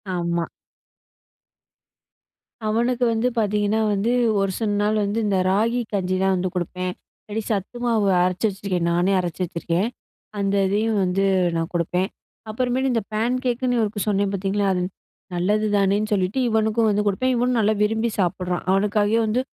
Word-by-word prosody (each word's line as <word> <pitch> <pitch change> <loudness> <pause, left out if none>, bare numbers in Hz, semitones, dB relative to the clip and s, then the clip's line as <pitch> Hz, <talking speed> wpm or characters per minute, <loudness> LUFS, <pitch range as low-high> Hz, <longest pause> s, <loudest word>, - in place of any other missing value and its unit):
ஆமா. 170 -1 -1 2.2
அவனுக்கு 240 +3 +1
வந்து 225 +3 +1
பார்த்தீங்கன்னா 210 0 +1
வந்து, 205 +4 0 0.3
ஒரு 195 -1 +1
சில 220 - 0
நாள் 215 +1 +1
வந்து 205 +3 -1
இந்த 195 - +1
ராகி 225 +5 +2
கஞ்சிதான் 190 0 +1
வந்து 185 0 -1
கொடுப்பேன். 180 +1 -3 0.3
இல்லாட்டி 215 +1 -3
சத்து 205 +3 -2
மாவு 220 -4 +2 0.2
அரைச்சு 185 +3 0
வச்சுருக்கேன், 190 -3 -2
நானே 175 +3 +2
அரைச்சு 175 0 -4
வச்சுருக்கேன். 170 +5 -1 0.5
அந்த 200 0 0
இதையும் 215 +2 +1
வந்து 185 +2 +1 0.3
நான் 165 0 -2
கொடுப்பேன். 180 +2 0 0.4
அப்புறமேட்டு 255 +3 0
இந்த 230 - +1
பேன்கேக்குன்னு 245 +2 0
இவருக்கு 210 -1 -1
சொன்னேன் 200 -1 +1
பார்த்தீங்களா? 195 +1 -1
அது 180 - -1 0.5
நல்லது 210 +5 +1
தானேன்னு 200 +2 +2
சொல்லிட்டு 190 +5 0
இவனுக்கும் 220 0 +2
வந்து 210 0 +1
கொடுப்பேன். 255 +6 +1
இவனும் 245 +1 +1
நல்லா 215 0 +3
விரும்பி 225 +2 +1
சாப்பிடுறான். 180 -1 -1
அவனுக்காகவே 205 +3 +2
வந்து 220 +4 +1
205 Hz, 140 wpm, -23 LUFS, 185-225 Hz, 2.2 s, நல்லா